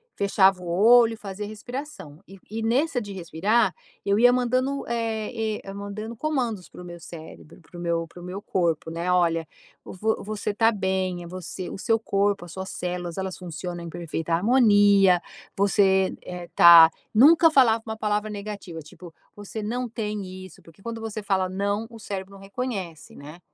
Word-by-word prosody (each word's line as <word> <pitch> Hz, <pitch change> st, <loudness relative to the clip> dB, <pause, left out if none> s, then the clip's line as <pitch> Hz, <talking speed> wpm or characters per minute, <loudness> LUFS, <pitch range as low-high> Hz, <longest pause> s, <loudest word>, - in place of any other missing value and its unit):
fechava 195 Hz, -2 st, +3 dB
o -, -, -7 dB
olho, 225 Hz, +6 st, +5 dB
fazia 205 Hz, -1 st, -7 dB
respiração. 215 Hz, -, -8 dB
E 195 Hz, 0 st, -14 dB
e 220 Hz, +2 st, -4 dB
nessa 260 Hz, +5 st, +1 dB
de 205 Hz, -4 st, -7 dB
respirar, 190 Hz, +5 st, +1 dB, 0.3 s
eu 200 Hz, 0 st, +1 dB
ia 245 Hz, +2 st, +6 dB
mandando, 255 Hz, +3 st, 0 dB
eh 225 Hz, -1 st, -2 dB
eh, 195 Hz, -, -8 dB
mandando 205 Hz, +3 st, -6 dB
comandos 245 Hz, -, -2 dB
para -, -, -12 dB
o -, -, -9 dB
meu 175 Hz, -1 st, -9 dB
cérebro, 165 Hz, 0 st, -12 dB
para 170 Hz, +2 st, -15 dB
o -, -, -7 dB
meu 170 Hz, -1 st, -1 dB
para 175 Hz, -, -14 dB
o 175 Hz, -, -10 dB
meu 185 Hz, +2 st, -6 dB
corpo, 170 Hz, -5 st, -1 dB
né, 170 Hz, +2 st, -2 dB
"Olha, 165 Hz, -2 st, +1 dB, 0.4 s
vo 220 Hz, +4 st, -2 dB
você 210 Hz, 0 st, -4 dB
tá 225 Hz, +1 st, +4 dB
bem, 190 Hz, -3 st, -2 dB
é 170 Hz, -, -9 dB
você 185 Hz, 0 st, -7 dB
o -, -, -7 dB
seu 225 Hz, +3 st, +1 dB
corpo, 200 Hz, -3 st, 0 dB
as 170 Hz, -, -12 dB
suas 190 Hz, 0 st, -6 dB
células 180 Hz, 0 st, -4 dB
elas 190 Hz, -1 st, -4 dB
funcionam 175 Hz, 0 st, -6 dB
em 170 Hz, -, -7 dB
perfeita 165 Hz, -1 st, -4 dB
harmonia, 205 Hz, -3 st, +5 dB, 0.3 s
você, 190 Hz, -1 st, +2 dB
eh, 180 Hz, -1 st, -7 dB
tá" 170 Hz, -1 st, +9 dB, 0.2 s
nunca 320 Hz, +8 st, +6 dB
falava 230 Hz, -6 st, +4 dB
uma 220 Hz, -1 st, -4 dB
palavra 210 Hz, -1 st, -1 dB
negativa 200 Hz, -5 st, -7 dB
tipo: 160 Hz, +2 st, -13 dB, 0.2 s
"Você 205 Hz, +2 st, -7 dB
não 245 Hz, +4 st, -3 dB
tem 210 Hz, -3 st, -4 dB, 0.2 s
isso", 180 Hz, -, -18 dB
porque 165 Hz, +3 st, -19 dB
quando 230 Hz, +2 st, -6 dB
você 220 Hz, -1 st, -5 dB
fala 195 Hz, -2 st, 0 dB
não 200 Hz, +3 st, -2 dB
o 230 Hz, -, -11 dB
cérebro 195 Hz, -2 st, -6 dB
não 195 Hz, -, -12 dB
reconhece, 195 Hz, -6 st, -6 dB
né? 150 Hz, +4 st, -11 dB
200 Hz, 180 wpm, -25 LUFS, 180-225 Hz, 0.4 s, tá